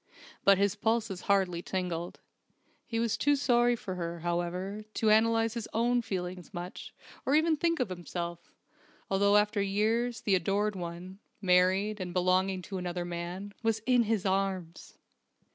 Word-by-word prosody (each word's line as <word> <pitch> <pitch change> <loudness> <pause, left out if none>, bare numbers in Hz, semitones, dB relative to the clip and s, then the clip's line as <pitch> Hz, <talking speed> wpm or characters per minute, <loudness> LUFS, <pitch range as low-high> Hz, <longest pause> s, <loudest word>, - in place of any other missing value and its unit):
But 200 -1 +6
his 200 0 +2
pulses 220 -2 -1
hardly 185 -4 +2
tingled. 175 -2 -4 0.7
He 230 - -2
was 230 -1 +1
too 290 0 +3
sorry 240 -3 +3
for 195 -5 -6
her, 170 -2 -4
however, 175 +4 -2
to 220 -1 +3
analyze 225 +1 +3
his 235 -3 -5
own 240 +2 +2
feelings 180 -4 -5
much, 175 +1 -7 0.3
or 275 - +2
even 315 +1 +4
think 335 +1 0
of 250 -6 0
himself, 175 -1 -6 0.6
although 200 +1 +4
after 210 0 +2
years 220 +4 0
the 200 - +1
Adored 200 +3 +1
One 180 +2 -7 0.2
married, 190 +2 +3
and 180 -1 -5
belonging 185 +1 +2
to 190 0 -5
another 175 -1 -3
man 175 +3 -5
was 225 -1 +1
in 245 -2 +4
his 215 -2 0
arms! 190 -3 -2
195 Hz, 150 wpm, -30 LUFS, 180-225 Hz, 0.7 s, But